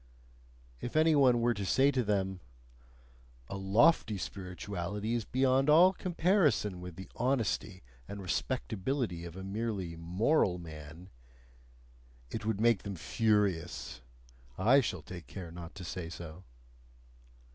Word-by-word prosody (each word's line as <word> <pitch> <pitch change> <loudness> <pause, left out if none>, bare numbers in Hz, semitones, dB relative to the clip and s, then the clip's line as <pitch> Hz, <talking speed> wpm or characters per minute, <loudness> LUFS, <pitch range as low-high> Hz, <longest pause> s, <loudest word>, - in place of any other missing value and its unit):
If 120 - -6
any 160 +1 +5
one 130 -5 +5
were 120 +1 +3
to 100 - -4
say 135 +8 +3
to 130 -2 +1
them 95 -3 -1 1.1
"A - - -4
lofty 105 +4 +3
spirituality 95 +3 -4
is 120 -3 -1
beyond 130 +2 +2
all 175 +5 +7
comparison 165 - +1
with 90 -2 -8
the 95 - -9
honesty 115 -6 -1 0.2
and 100 - -7
respectability 105 -1 -2
of 85 -1 -9
a 95 - -7
merely 100 -4 -3
moral 90 - +1
man" 80 +1 -10 1.2
it 110 -1 -4
would 110 -3 0
make 115 -3 +3
them 100 -1 -5
furious, 90 - 0 0.6
I 125 +8 +5
shall 90 - -3
take 90 -2 -9
care 90 -4 -8
not 85 +1 -9
to 95 - -8
say 85 -1 -5
so. 85 +1 -9
100 Hz, 130 wpm, -32 LUFS, 90-120 Hz, 1.2 s, all